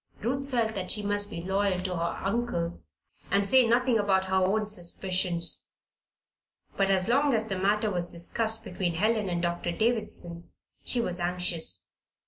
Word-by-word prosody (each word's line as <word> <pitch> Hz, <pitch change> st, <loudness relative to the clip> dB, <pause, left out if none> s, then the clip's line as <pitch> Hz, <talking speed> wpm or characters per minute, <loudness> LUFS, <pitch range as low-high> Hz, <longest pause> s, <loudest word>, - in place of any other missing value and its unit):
Ruth 270 Hz, +4 st, -2 dB
felt 230 Hz, -4 st, 0 dB
that 190 Hz, -3 st, -4 dB
she 210 Hz, -, +2 dB
must 205 Hz, 0 st, +1 dB
be 170 Hz, 0 st, -6 dB
loyal 190 Hz, -1 st, 0 dB
to 185 Hz, -1 st, -2 dB
her 170 Hz, 0 st, -2 dB
uncle 195 Hz, -6 st, -2 dB, 0.5 s
and 200 Hz, +1 st, +2 dB
say 255 Hz, +2 st, +5 dB
nothing 240 Hz, 0 st, +3 dB
about 190 Hz, -2 st, +2 dB
her 190 Hz, -, -4 dB
own 195 Hz, +3 st, +2 dB
suspicions; 180 Hz, -3 st, -1 dB, 1.1 s
but 195 Hz, -1 st, +1 dB
as 190 Hz, -1 st, +3 dB
long 275 Hz, +2 st, +3 dB
as 220 Hz, 0 st, -1 dB
the 195 Hz, -, -2 dB
matter 210 Hz, +2 st, +1 dB
was 175 Hz, -2 st, -1 dB
discussed 220 Hz, +6 st, 0 dB
between 180 Hz, -2 st, -2 dB
Helen 215 Hz, +2 st, +1 dB
and 175 Hz, 0 st, -2 dB
Doctor 175 Hz, 0 st, -1 dB
Davison 210 Hz, -5 st, -2 dB, 0.3 s
she 245 Hz, -, +1 dB
was 180 Hz, -6 st, -1 dB
anxious. 175 Hz, -, -1 dB
195 Hz, 160 wpm, -28 LUFS, 175-220 Hz, 1.1 s, say